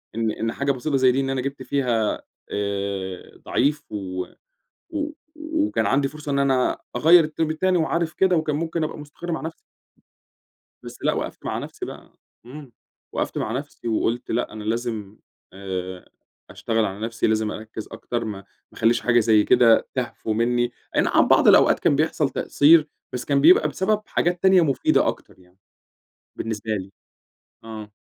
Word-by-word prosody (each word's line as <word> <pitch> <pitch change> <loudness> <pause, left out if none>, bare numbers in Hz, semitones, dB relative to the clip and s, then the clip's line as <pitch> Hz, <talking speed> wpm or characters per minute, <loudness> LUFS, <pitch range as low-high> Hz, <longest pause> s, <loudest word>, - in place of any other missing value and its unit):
إن 115 -1 0
إن 115 +1 -2
حاجة 140 0 0
بسيطة 135 +2 -1
زي 130 -1 +5
دي، 130 - 0
إن 135 -1 -1
أنا 135 -1 -1
جِبت 140 0 -5
فيها 120 -6 0 0.3
آآ 100 -2 -4
ضعيف 145 +3 +1
و 95 -3 -4 0.6
و 305 -1 -3 0.2
وكان 310 0 -1
عندي 135 0 +2
فرصة 150 0 -7
إن 140 - +1
أنا 135 -2 +2 0.2
أغيّر 165 +6 +7
الترم 155 +1 -2
التاني 180 +4 +1
وعارف 165 0 0
كده 190 -1 +3
وكان 155 -2 0
ممكن 165 +1 -2
أبقى 155 - -4
مستقِر 150 +4 -8
مع 160 - -2
نفْسي. 160 +1 -6 1.3
بس - - -10
لأ - - +2
وقفْت - - -5
مع - - -2
نفسي - - -7
بقى، - - -11 0.3
امم، 135 0 -11 0.4
وقّفت - - -2
مع 105 - -2
نفسي 135 -1 -5
وقُلت 115 +2 -1
لأ، 120 +2 -1
أنا 110 -1 -8
لازم 110 -2 -3 0.3
آآ 95 -1 -6 0.4
أشتغل 115 -1 -1
على 100 +1 -4
نفسي، 115 +1 -1
لازم 110 -1 +1
أركّز 110 0 -8
أكتر، 115 +1 -4
ما 105 -3 -5 0.3
ما - - -13
أخلّيش 115 +1 +3
حاجة 120 -1 +3
زي 110 -1 +4
كده 115 -2 +5
تهفو 125 -3 -3
منِّي، 120 +2 +1 0.2
أينَعم - - +3
بعض - - +5
الأوقات - - +6
كان 140 - +3
بيحصَل 155 -1 +1
تقصير، 155 +3 +4 0.2
بس 125 0 -4
كان 140 -1 +2
بيبقى 170 +5 +6
بسبب 210 +3 0
حاجات 175 0 0
تانية 190 -2 +6
مفيدة 140 -4 +2
أكتر - - -6
يعني، 90 0 -24 0.8
بالنسبة 110 0 -4
لي. 95 -2 -3 0.7
آه. 110 -2 -9
125 Hz, 165 wpm, -23 LUFS, 110-155 Hz, 1.3 s, أغيّر